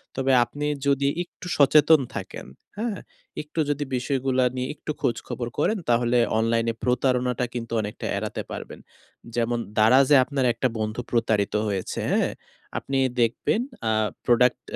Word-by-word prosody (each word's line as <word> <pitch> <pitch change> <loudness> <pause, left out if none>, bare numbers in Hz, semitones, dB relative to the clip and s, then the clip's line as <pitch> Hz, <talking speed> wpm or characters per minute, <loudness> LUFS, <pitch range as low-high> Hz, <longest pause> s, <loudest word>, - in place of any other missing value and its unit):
তবে 135 0 +1
আপনি 145 +4 -5 0.2
যদি 140 0 +2 0.2
একটু 175 - -15
সচেতন 150 +2 +6 0.2
থাকেন। - - -6 0.3
হ্যাঁ, 220 -2 -2 0.4
একটু 150 +2 -7
যদি 145 0 0
বিষয়গুলা 130 0 0
নিয়ে 130 0 -2
একটু 155 - -5
খোঁজখবর 120 +1 -2
করেন 220 - +1
তাহলে 120 +1 +3 0.2
অনলাইনে 115 0 +1
প্রতারণাটা 125 0 +1
কিন্তু 115 -2 -5
অনেকটা 105 0 -6
এড়াতে - - -3
পারবেন। - - -7 0.6
যেমন 120 0 0 0.2
দারাজে 130 +6 +6
আপনার 135 -1 -1
একটা 120 +3 0
বন্ধু 110 +2 -2
প্রতারিত 110 -4 +1
হয়েছে 95 -3 -3
হ্যাঁ, - - +2 0.5
আপনি 135 - -2 0.2
দেখবেন 120 - +1 0.3
আ - - +2 0.3
প্রোডাক্ট 125 +1 +3
125 Hz, 135 wpm, -25 LUFS, 115-140 Hz, 0.6 s, সচেতন